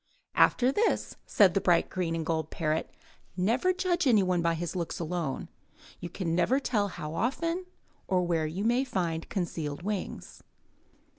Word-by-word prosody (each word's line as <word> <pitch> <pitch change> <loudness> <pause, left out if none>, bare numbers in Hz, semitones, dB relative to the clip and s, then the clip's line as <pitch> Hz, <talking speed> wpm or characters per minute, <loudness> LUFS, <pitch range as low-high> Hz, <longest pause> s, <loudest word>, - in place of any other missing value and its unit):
"After 255 +1 +4
this," 430 +11 0
said 195 -4 +5
the 195 - +1
bright 170 -2 +3
green 170 -3 -1
and 165 -1 -3
gold 160 -1 -1
parrot, 155 -1 -1 0.5
"never 230 - +2
judge 360 -3 0
any 220 -6 +5
one 180 -2 +1
by 170 0 +1
his 170 +2 -4
looks 170 -2 -3
alone. 165 -4 -3 0.5
You 175 - -6 0.2
never 175 +10 +2
can 280 - -3
tell 210 -5 +1
how 165 -5 -6
often 335 - -1 0.4
or 185 -1 +2
where 165 -3 0
you 175 +6 -4
may 240 +4 +3
find 175 -10 -2
concealed 165 -4 -3
wings. 205 -1 -5
180 Hz, 160 wpm, -29 LUFS, 165-240 Hz, 0.5 s, said